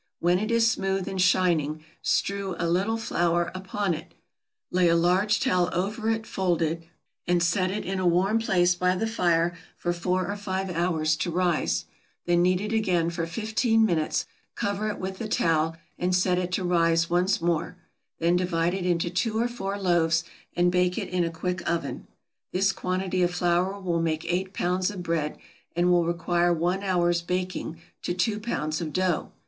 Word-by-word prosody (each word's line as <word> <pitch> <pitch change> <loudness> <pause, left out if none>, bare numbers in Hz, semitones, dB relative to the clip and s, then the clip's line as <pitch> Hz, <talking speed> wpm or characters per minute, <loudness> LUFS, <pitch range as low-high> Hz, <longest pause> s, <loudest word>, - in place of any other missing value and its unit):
When 175 +1 +3
it 215 +2 -2
is 230 -1 +4
smooth 195 -2 -1
and 190 -1 -2
shining 165 -5 +2 0.2
strew 200 -2 0
a 170 - -1
little 195 +7 +1
flour 175 -5 0
upon 190 0 -2
it, 160 +2 -8 0.6
lay 180 -1 +3
a 170 - +4
large 180 +5 +3
towel 180 -1 +2
over 210 +5 -1
it 225 0 -1
folded, 165 -4 -1 0.4
and 175 -1 +2
set 185 +2 +2
it 205 +3 -3
in 190 +1 -2
a 185 - +1
warm 190 +6 +3
place 180 -5 +3
by 180 +1 +1
the 195 - -1
fire 175 -5 +1 0.2
for 175 - -1
four 180 +1 -1
or - - -3
five 190 -1 -3
hours 165 -3 +1
to 170 - -2
rise; 165 - 0 0.4
then 175 0 +3
knead 180 +1 +2
it 210 +2 -3
again 180 -6 +1
for 165 -1 -3
fifteen 225 +4 +1
minutes, 165 -6 0 0.3
cover 205 +1 -1
it 210 - -3
with 190 0 -5
the 225 - -3
towel, 165 -4 +1 0.2
and 180 +1 +1
set 180 0 +2
it 180 0 -3
to 185 - 0
rise 165 -1 +2
once 180 +3 +2
more; 170 +1 -1 0.4
then 170 +1 +2
divide 175 -1 +1
it 185 -1 -2
into 170 -1 0
two 220 +4 0
or 235 - +2
four 200 -5 -4
loaves, 170 -4 +2 0.3
and 175 0 +3
bake 180 0 +1
it - - -3
in 180 -1 +1
a 165 - 0
quick 180 +2 -3
oven. 170 0 -3 0.4
This 195 +2 +2
quantity 185 0 -2
of 175 0 +1
flour 180 +3 +1
will 175 -3 -1
make 160 -1 -1
eight 185 +1 -1
pounds 180 0 0
of 190 -4 -6
bread, 165 -3 -1 0.4
and 175 +1 +3
will 175 -1 +4
require 175 +1 +1
one 175 +3 0
hour's 175 -3 +1
baking 180 -2 -3 0.2
to 175 - -2
two 210 +4 0
pounds 155 -8 -2
of 155 -3 -4
dough. 185 -3 0
180 Hz, 185 wpm, -26 LUFS, 170-190 Hz, 0.6 s, is